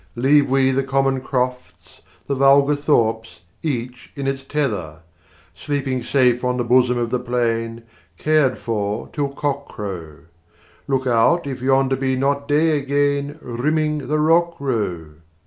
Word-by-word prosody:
Leave 140 +3 +3
we 135 0 +3
the 135 +1 +1
common 135 -1 0
crofts, 125 -1 -4 0.2
the 140 - -2
vulgar 140 +2 +4
thorpes 115 - 0 0.2
Each 125 -4 -4
in 140 - -5
its 135 0 -2
tether 105 - -3 0.5
Sleeping 135 -3 -3
safe 125 -1 +2
on 125 0 0
the 120 - 0
bosom 125 +1 +3
of 120 -1 -2
the 125 - 0
plain, 115 -2 -2 0.3
Cared 150 -4 +2
for 105 -2 -3
till 145 -2 -1
cock 140 0 -3
crow: 85 -8 -7 0.7
Look 135 -1 0
out 130 +8 +3
if 130 -3 -5
yonder 135 0 +2
be 130 0 -1
not 140 +2 -1
day 150 +1 +2
again 140 +1 0
Rimming 150 +4 -1
the 150 +2 0
rock 170 +2 +3
row! 90 - -3
135 Hz, 145 wpm, -21 LUFS, 120-140 Hz, 0.7 s, vulgar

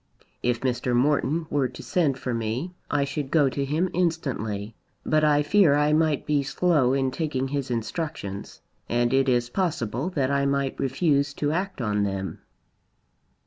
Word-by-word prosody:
"If 120 -1 0
Mr. 125 -1 0
Morton 150 +5 +2
were 140 -3 +2
to 125 - -11
send 150 -7 +1
for 130 -2 -3
me, 115 +10 -2 0.2
I 145 -1 +1
should 140 0 -3
go 145 -3 +4
to 140 +2 -2
him 155 +6 0
instantly. 120 - -2 0.3
But 155 0 +2
I 150 -1 +4
fear 160 -2 +4
I 150 +1 +3
might 155 -2 +2
be 150 -1 +2
slow 140 -2 +2
in 135 -1 +1
taking 135 -4 -2
his 140 -2 -2
instructions; 115 - -4 0.3
and 120 +1 +1
it 135 0 +3
is 120 -1 +1
possible 145 - -1
that 140 -7 0
I 140 0 +2
might 140 -1 -1
refuse 140 0 +1
to 145 0 0
act 185 -1 -2
on 105 -3 0
them." 95 -1 -3
140 Hz, 165 wpm, -25 LUFS, 125-155 Hz, 0.3 s, go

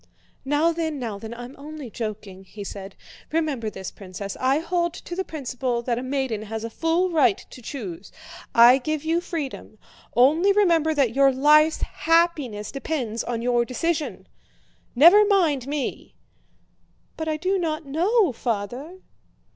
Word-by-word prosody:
"Now 295 +4 +2
then, 320 -2 -2
now 225 -6 -5
then, 220 +2 -8
I'm 245 +3 -8
only 295 -4 -8
joking!" 205 -4 -6
he 205 +2 -9
said. 195 0 -8 0.4
"Remember 300 -8 -1
this, 190 -3 -7
Princess, 195 0 -7
I 260 +2 +2
hold 345 +1 -1
to 350 - -7
the 380 - -1
principle 255 -6 -3
that 240 -1 -1
a - - -4
maiden 260 -4 -2
has 220 +1 -5
a 230 - -5
full 330 +6 0
right 265 - +3
to 250 - -11
choose. 205 - -7 0.4
I 240 +3 +8
give 310 +3 -3
you 330 +2 +1
freedom. 295 -10 -6 0.4
Only 310 - +4
remember 335 -6 +3
that 265 -6 +2
your 275 +1 +5
life's 300 +4 +4
happiness 310 -11 0
depends 270 -6 -3
on 235 -1 -3
your 240 -1 +2
decision. 310 +6 -3 0.7
Never 345 - +8
mind 335 - +2
me!" 290 -2 -4 1.0
"But 320 - -5
I 310 -1 0
do 375 +4 0
not 320 -2 -2
know, 355 - +2
Father!" 245 - -4
275 Hz, 150 wpm, -24 LUFS, 235-325 Hz, 1.0 s, I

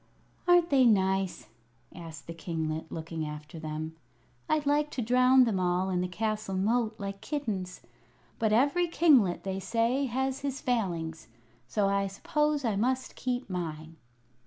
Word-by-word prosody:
"Aren't 350 -2 +5
they 270 -2 +5
nice?" 190 -4 +2 0.5
asked 165 -2 -9
the 165 - -7
kinglet, 160 -1 -4
looking 160 0 -4
after 150 +1 -7
them. 155 0 -5 0.5
"I'd 310 -1 +1
like 295 +1 +2
to 255 - -3
drown 255 +2 +5
them 220 -6 +1
all 180 +1 +1
in 180 -1 +1
the 180 - -1
castle 215 +1 -2
moat, 220 +3 +1
like 195 -1 -6
kittens; 210 -12 -4 0.6
but 220 -2 +2
every 285 +10 +3
kinglet, 275 - +4
they 190 0 -3
say, 235 +6 +1
has 265 +2 -1
his 275 -1 -3
Failings, 170 -10 -2 0.4
so 200 +9 +1
I 200 0 +1
suppose 300 +8 0
I 220 -3 +1
must 255 +5 -1
keep 250 0 -2
mine." 165 -3 -5
205 Hz, 150 wpm, -29 LUFS, 175-255 Hz, 0.6 s, Aren't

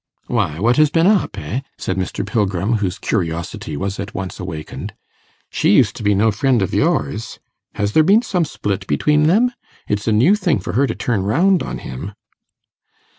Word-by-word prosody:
'Why, 75 +1 -1
what 120 +6 +2
has 155 -1 +5
been 165 +3 +2
up, 205 0 +2
eh?' 95 - -3 0.2
said 95 - -3
Mr. 95 -2 -3
Pilgrim, 105 0 0
whose 100 -2 -2
curiosity 85 -6 -3
was 95 +3 -3
at 100 +2 -6
once 95 -1 -5
awakened. 80 -4 -6 0.6
'She - - +2
used - - +3
to - - -8
be 105 -1 +2
no 110 +3 +3
friend 120 +1 +1
of 95 - -3
yours. 75 +10 0 0.4
Has 105 -1 -1
there 155 - +5
been 200 +9 +4
some 180 -7 0
split 100 -8 -4
between 150 - +2
them? 225 +9 +3 0.4
It's 105 +1 -2
a - - +3
new 125 - +4
thing 180 - +1
for 95 - -5
her 135 +6 +2
to - - -3
turn 115 -6 -1
round 170 - +2
on - - -4
him. 85 +11 -7
105 Hz, 185 wpm, -19 LUFS, 95-150 Hz, 0.6 s, has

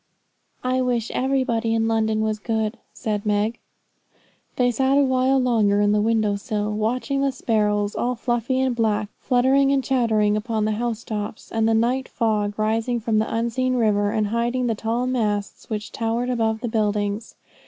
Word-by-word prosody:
'I 255 +1 +1
wish 240 -3 -1
everybody 250 -4 0
in 225 0 +1
London 220 -1 +1
was 215 -1 -1
good,' 220 +1 -2
said 210 -4 -3
Meg. 210 +2 0 1.0
They 245 -1 +2
sat 265 +3 +2
a 285 - +5
while 260 0 +2
longer 225 -6 +2
on 205 0 +3
the 210 0 +2
window 215 -2 +1
sill, 210 +1 -2
watching 250 +6 -1
the 275 0 +2
sparrows, 210 -4 0
all 250 +1 -1
fluffy 240 +2 -1
and 260 -2 +1
black, 215 -3 0
fluttering 270 +2 +3
and 275 -1 +2
chattering 220 -6 +2
upon 215 0 -1
the 215 - +1
house 230 +1 -2
tops, 210 -1 -5
and 225 0 +1
the 225 - +3
night 250 +4 +1
fog 210 -3 -1
rising 225 +3 0
from 220 -1 +1
the 220 - -1
unseen 240 +3 0
river, 210 -4 +2
and 215 0 0
hiding 240 +3 0
the 235 - +1
tall 225 +3 -1
masts, 210 -5 -2
which 215 -1 -4
towered 235 +2 -1
above 220 -2 0
the 245 - -2
buildings. 210 -1 -1
225 Hz, 175 wpm, -23 LUFS, 215-250 Hz, 1.0 s, a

